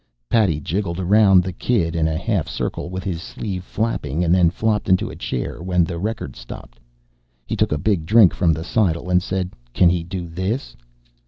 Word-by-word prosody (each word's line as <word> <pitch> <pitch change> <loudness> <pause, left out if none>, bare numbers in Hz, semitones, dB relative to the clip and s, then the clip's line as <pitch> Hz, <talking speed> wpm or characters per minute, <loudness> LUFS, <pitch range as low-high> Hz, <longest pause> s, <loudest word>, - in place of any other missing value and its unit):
Paddy 95 -10 +3
jigged 85 +3 -2
around 95 0 +5
the 95 0 -4
kid 85 -5 0
in 80 -1 +2
a 80 -1 -1
half 100 -2 -1
circle - - -4
with 95 0 -5
his 85 -3 -3
sleeve 100 -4 -5
flapping 95 - -2
and 85 0 +3
then 90 -2 +5
flopped 105 +3 -1
into 95 0 +2
a - - -9
chair 65 +5 -4
when 90 0 +2
the 85 0 -4
record 105 - -4
stopped. - - -11 0.7
He - - -3
took - - +1
a 75 - +1
big 95 0 0
drink 110 -3 +6
from 85 -3 +2
the 80 +1 -2
seidel 90 -3 0
and 90 0 +4
said: 95 0 -3 0.2
"Can 85 -2 +5
he 90 -1 0
do 90 0 -5
this?" 95 - -3
90 Hz, 195 wpm, -21 LUFS, 85-100 Hz, 0.7 s, drink